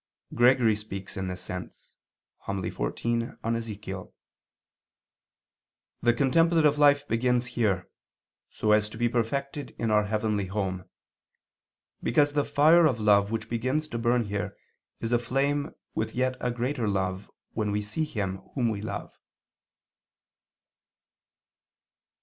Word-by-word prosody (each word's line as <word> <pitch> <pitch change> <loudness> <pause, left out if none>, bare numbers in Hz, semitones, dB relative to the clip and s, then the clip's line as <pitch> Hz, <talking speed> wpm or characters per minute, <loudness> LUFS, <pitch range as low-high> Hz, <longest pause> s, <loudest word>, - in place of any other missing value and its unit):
Gregory 120 -2 +5
speaks 100 -2 -7
in 95 -1 -3
this 90 -1 -5
sense - - -8 0.5
(Hom. 100 -1 -3
xiv - - -4
in 115 0 -1 0.2
Ezech.): 105 -5 -5 1.9
"The 120 - +4
contemplative 150 +2 +3
life 145 -1 +5
begins 125 +1 +1
here, 100 -7 +1 0.6
so 105 - 0
as 105 0 +4
to 110 - -10
be 120 +1 +2
perfected 140 +5 -2
in 115 -1 -1
our 105 0 +4
heavenly 105 -2 -1
home, 95 -2 -3 1.2
because 145 +4 +2
the 145 -1 +2
fire 160 +4 +5
of 125 -6 -1
love 100 -1 +4
which 110 -1 -3
begins 130 +7 -1
to 120 - -3
burn 120 +1 +2
here 100 -1 -4 0.4
is 115 - -2
aflame 135 +5 0 0.2
with 110 - -2
a - - -10
yet 130 -1 0
greater 125 -1 -1
love 95 -1 -1 0.2
when 110 -2 -1
we 105 0 -1
see 105 +10 -2
Him 100 -9 -3 0.2
Whom 120 -4 +2
we 105 -2 -3
love." 110 - -5
115 Hz, 125 wpm, -27 LUFS, 105-130 Hz, 1.9 s, Gregory